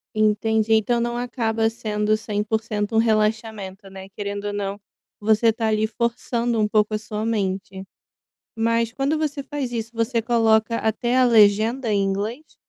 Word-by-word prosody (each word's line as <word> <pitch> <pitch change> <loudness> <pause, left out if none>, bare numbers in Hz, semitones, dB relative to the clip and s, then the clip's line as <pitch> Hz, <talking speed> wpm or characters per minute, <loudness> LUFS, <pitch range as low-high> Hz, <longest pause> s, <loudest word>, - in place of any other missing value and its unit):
Entendi. 215 +1 +2
Então 220 +2 +2
não 240 0 -1
acaba 230 -2 0
sendo 215 -1 -1
100% 215 0 -2
um - - +4
relaxamento, 215 -3 0
né? 190 0 -10
Querendo 200 0 -5
ou 205 - -3
não, 200 -1 -3 0.4
você 220 +2 +3
tá 225 0 -2
ali 215 0 +1
forçando 235 +1 -1
um 210 - +2
pouco 210 0 +1
a - - +1
sua 215 0 -5
mente. 190 -3 -2 0.7
Mas 230 0 0
quando 275 +5 -1
você 300 -2 -2
faz 275 -2 -4
isso, 230 -1 -4
você 230 +1 0
coloca 225 -1 +2
até 235 +3 0
a 260 - +5
legenda 225 +1 +4
em 200 -1 +2
inglês? 210 +10 -3
220 Hz, 155 wpm, -22 LUFS, 210-230 Hz, 0.7 s, a